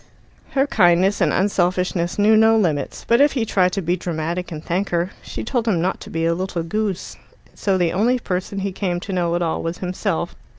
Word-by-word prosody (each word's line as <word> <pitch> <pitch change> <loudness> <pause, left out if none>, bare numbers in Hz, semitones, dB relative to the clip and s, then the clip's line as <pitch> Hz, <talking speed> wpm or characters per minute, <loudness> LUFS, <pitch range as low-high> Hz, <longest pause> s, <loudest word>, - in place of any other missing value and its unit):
Her 270 0 +3
kindness 190 -4 +3
and - - +3
unselfishness 180 -2 0
knew 210 +1 +5
no 220 +1 +5
limits, 155 -9 -1
but 235 +3 +4
if 290 0 +4
he 245 -5 0
tried 185 -4 +2
to 195 - -2
be 175 +2 +1
dramatic 170 +1 -3
and 155 -1 -7
thank 185 +4 -1
her, 175 +2 0
she - - -6
told 240 -1 -1
him 190 -6 +2
not 185 +3 -1
to - - -10
be 165 0 -1
a 165 - +2
little 180 -1 -3
goose. 200 +2 -3 0.3
And - - -23
so 195 -2 +1
the 175 -2 +1
only 230 +7 +2
person 190 -3 -3
he 195 0 -2
came 180 -2 -2
to 195 +2 -6
know 175 -2 0
at 175 - 0
all 165 - -1
was 165 +1 -3
himself. 180 -1 -2
185 Hz, 220 wpm, -21 LUFS, 170-205 Hz, 0.3 s, knew